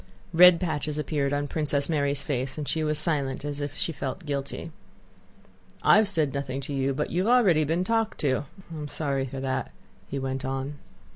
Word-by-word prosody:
Red 180 Hz, 0 st, +8 dB
patches 155 Hz, -4 st, -2 dB
appeared 145 Hz, -1 st, 0 dB
on 145 Hz, 0 st, 0 dB
Princess 145 Hz, -1 st, -1 dB
Mary's 145 Hz, -3 st, 0 dB
face 135 Hz, -2 st, -2 dB
and 150 Hz, -2 st, -4 dB
she 160 Hz, -, +1 dB
was 150 Hz, 0 st, +1 dB
silent 140 Hz, -5 st, -1 dB
as 145 Hz, 0 st, -4 dB
if 145 Hz, 0 st, -4 dB
she 165 Hz, -, 0 dB
felt 145 Hz, +4 st, -5 dB
guilty. 140 Hz, +3 st, -4 dB, 1.1 s
"I -, -, +7 dB
have 215 Hz, -1 st, +4 dB
said 160 Hz, -8 st, +1 dB
nothing 140 Hz, -1 st, -3 dB
to 140 Hz, +1 st, -4 dB
you, 135 Hz, 0 st, +1 dB
but 150 Hz, -, -2 dB
you 185 Hz, +4 st, +1 dB
have 245 Hz, +1 st, +6 dB
already 175 Hz, -10 st, +4 dB
been 165 Hz, +4 st, +1 dB
talked 225 Hz, +2 st, 0 dB
to. 135 Hz, -1 st, +1 dB, 0.3 s
And 160 Hz, -, -6 dB
I -, -, -5 dB
am 150 Hz, -, -4 dB
sorry 140 Hz, -3 st, -1 dB
for 135 Hz, +1 st, -6 dB
that," 130 Hz, -1 st, -2 dB, 0.4 s
he 140 Hz, -, -4 dB
went 135 Hz, -1 st, -3 dB
on. 135 Hz, +2 st, -3 dB
145 Hz, 205 wpm, -27 LUFS, 135-160 Hz, 1.1 s, Red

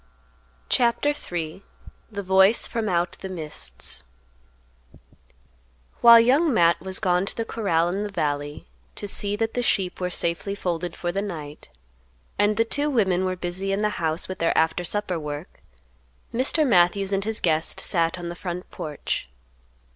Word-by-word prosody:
CHAPTER 240 Hz, +4 st, +2 dB
III. 175 Hz, -, -4 dB, 0.5 s
THE 200 Hz, -1 st, -4 dB
VOICE 190 Hz, +3 st, +4 dB
FROM 225 Hz, -2 st, -2 dB
OUT 175 Hz, -1 st, +1 dB
THE 190 Hz, -, -5 dB
MISTS. 110 Hz, -, -5 dB, 2.0 s
While 235 Hz, -1 st, +10 dB
Young 275 Hz, +8 st, +4 dB
Matt 170 Hz, -7 st, +4 dB
was 190 Hz, +1 st, -3 dB
gone 180 Hz, -1 st, +1 dB
to -, -, -3 dB
the 230 Hz, -, -1 dB
corral 170 Hz, -8 st, +1 dB
in 195 Hz, +3 st, -2 dB
the 210 Hz, -, -3 dB
valley 145 Hz, -5 st, -2 dB, 0.3 s
to 205 Hz, -, -6 dB
see 200 Hz, 0 st, -1 dB
that 225 Hz, +1 st, -1 dB
the 245 Hz, -, 0 dB
sheep 190 Hz, -6 st, 0 dB
were 180 Hz, -, 0 dB
safely 170 Hz, +3 st, -1 dB
folded 175 Hz, -3 st, -3 dB
for 175 Hz, -, -2 dB
the 195 Hz, +3 st, -1 dB
night, 155 Hz, -7 st, -6 dB, 0.7 s
and 210 Hz, +1 st, +3 dB
the 225 Hz, -, +3 dB
two 285 Hz, +6 st, 0 dB
women 190 Hz, -8 st, +2 dB
were 185 Hz, 0 st, -1 dB
busy 180 Hz, +2 st, -3 dB
in 200 Hz, +2 st, 0 dB
the 210 Hz, -, +3 dB
house 160 Hz, +1 st, 0 dB
with 185 Hz, -, -6 dB
their 165 Hz, -, +1 dB
after 160 Hz, +2 st, +2 dB
supper 185 Hz, -1 st, -1 dB
work, 150 Hz, +2 st, -7 dB, 0.7 s
Mr. 265 Hz, +6 st, +2 dB
Matthews 195 Hz, -2 st, +3 dB
and 195 Hz, 0 st, +1 dB
his 220 Hz, +1 st, -1 dB
guest 160 Hz, -2 st, +1 dB
sat 170 Hz, 0 st, +1 dB
on 175 Hz, -1 st, -6 dB
the 170 Hz, -, -6 dB
front 180 Hz, 0 st, -6 dB
porch. 145 Hz, -, -4 dB
185 Hz, 160 wpm, -24 LUFS, 170-210 Hz, 2.0 s, While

